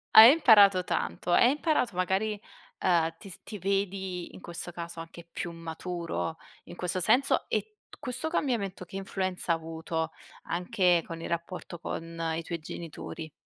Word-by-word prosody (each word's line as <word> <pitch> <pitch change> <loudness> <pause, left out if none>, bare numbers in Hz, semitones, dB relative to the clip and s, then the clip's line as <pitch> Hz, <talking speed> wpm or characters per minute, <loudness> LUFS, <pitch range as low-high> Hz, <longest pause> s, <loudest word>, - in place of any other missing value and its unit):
Hai 225 +5 +12
imparato 205 - +7
tanto, 175 - -2
hai 240 +8 +6
imparato 295 - +1
magari, 195 +4 0 0.4
uhm, 165 -3 +2
ti 195 - -11
s 180 - -10
ti 210 - -7
vedi 190 -1 -2
in - - -11
questo 175 0 -5
caso 170 -1 -6
anche 165 +1 -9
più 175 - -4
maturo 165 0 -4 0.3
in 175 - -10
questo 180 +1 -1
senso, 245 +9 +4
e 425 -1 -2
t - - -14
questo 285 +3 -1
cambiamento, 230 - -1
che 190 +3 -8
influenza 185 -3 -1
ha - - +2
avuto 160 0 -4 0.4
anche 175 0 +2
con 165 -1 -6
il - - -5
rapporto 170 0 -4
con 165 0 -6 0.2
i 165 - -3
tuoi 170 0 -4
genitori? 160 -1 -7
180 Hz, 160 wpm, -29 LUFS, 165-200 Hz, 0.4 s, Hai